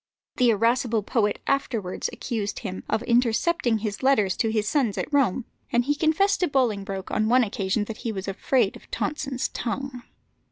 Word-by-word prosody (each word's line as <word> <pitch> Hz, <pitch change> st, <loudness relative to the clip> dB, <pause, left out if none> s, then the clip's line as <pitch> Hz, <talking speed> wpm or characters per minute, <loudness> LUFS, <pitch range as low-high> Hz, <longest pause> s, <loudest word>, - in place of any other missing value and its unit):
The 250 Hz, -1 st, +4 dB
irascible 230 Hz, 0 st, +2 dB
poet 210 Hz, -1 st, +1 dB
afterwards 230 Hz, -9 st, -1 dB
accused 210 Hz, -4 st, -3 dB
him 190 Hz, -2 st, -4 dB
of 220 Hz, +2 st, 0 dB
intercepting 240 Hz, +2 st, +2 dB
his 210 Hz, -2 st, -4 dB
letters 215 Hz, -9 st, +3 dB
to 225 Hz, -, +1 dB
his 215 Hz, -1 st, 0 dB
sons 245 Hz, -8 st, +1 dB
at 305 Hz, -, -3 dB
Rome, 255 Hz, -4 st, +2 dB, 0.3 s
and 240 Hz, 0 st, +2 dB
he 290 Hz, -, +2 dB
confessed 320 Hz, +7 st, +2 dB
to 360 Hz, -, +2 dB
Bolingbroke 205 Hz, -8 st, -1 dB
on 215 Hz, 0 st, +1 dB
one 250 Hz, +1 st, +5 dB
occasion 200 Hz, 0 st, -1 dB
that 215 Hz, +1 st, -6 dB
he 230 Hz, -, -3 dB
was 195 Hz, -2 st, -5 dB
afraid 205 Hz, +2 st, +1 dB
of -, -, -15 dB
Tonson's 275 Hz, -4 st, -2 dB
tongue. 255 Hz, +1 st, -4 dB
230 Hz, 170 wpm, -25 LUFS, 210-265 Hz, 0.3 s, one